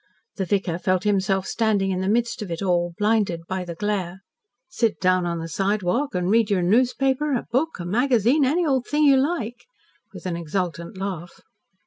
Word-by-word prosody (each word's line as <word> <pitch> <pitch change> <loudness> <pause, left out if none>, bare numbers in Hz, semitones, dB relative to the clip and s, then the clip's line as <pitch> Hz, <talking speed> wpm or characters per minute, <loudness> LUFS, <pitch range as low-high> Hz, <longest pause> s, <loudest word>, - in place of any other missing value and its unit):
The 190 - -1
vicar 180 -2 -1
felt 185 0 0
himself 195 -2 +1
standing 205 -3 +1
in 185 0 -1
the 190 - -1
midst 235 +1 0
of 205 - -5
it 170 +3 -4
all, 175 -2 0
blinded 205 -5 +1
by 185 -1 -3
the 170 -1 -7
glare. 190 -2 -3 0.5
"Sit 235 -11 -1
down 185 -1 +2
on 170 0 -2
the 165 0 -5
sidewalk 200 - -1
and 180 0 0
read 225 -1 +3
your 190 -3 +1
newspaper, 260 +7 +2
a 240 - -3
book, 280 - 0
a 175 - -5
magazine 245 - +2
any 320 +7 +2
old 265 -5 0
thing 300 +1 +1
you 280 -2 +6
like," 260 -5 -2 0.4
with - - -11
an 180 -2 -2
exultant 170 +2 -4
laugh. 185 -3 -6
200 Hz, 185 wpm, -23 LUFS, 180-240 Hz, 0.5 s, you